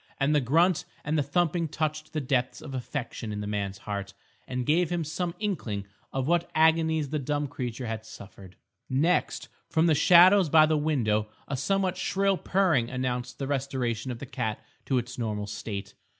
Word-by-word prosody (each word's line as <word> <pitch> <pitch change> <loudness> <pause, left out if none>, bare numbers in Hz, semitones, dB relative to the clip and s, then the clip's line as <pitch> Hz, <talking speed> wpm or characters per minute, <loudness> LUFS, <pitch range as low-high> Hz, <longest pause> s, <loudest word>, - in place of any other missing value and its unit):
And 140 +2 +2
the 150 - +4
grunt 165 +7 +3 0.2
and 150 - 0
the 150 - +3
thumping 165 +3 +1
touched 155 0 -3
the 155 - -2
depth 130 -1 0
of 140 - -8
affection 120 -3 -4
in 105 - -4
the 105 - -4
man's 100 -2 -3
heart, 100 -1 -5 0.3
and 125 -1 -3
gave 165 +4 +2
him 175 -1 -1
some 170 +3 -3
inkling 135 - -3 0.3
of 135 0 -2
what 170 +1 +1
agonies 160 -2 +3
the 150 - -1
dumb 145 +2 -1
creature 125 -1 -5
had 110 -1 -4
suffered. 100 -4 -12 0.3
Next, 155 +7 +1 0.2
from 160 0 +3
the 165 - +4
shadows 175 +4 +7
by 155 +1 +7
the 155 0 +1
window, 120 -9 +1 0.2
a 135 - -2
somewhat 185 +6 0
shrill 195 +1 +1
purring 170 -11 +2
announced 125 -1 -3
the 135 - -3
restoration 130 -4 -2
of 120 - -4
the 140 - -7
cat 110 -4 -3 0.3
to 135 - +1
its 125 +1 -4
normal 105 -3 -2
state. 100 0 -6
140 Hz, 180 wpm, -27 LUFS, 120-160 Hz, 0.3 s, shadows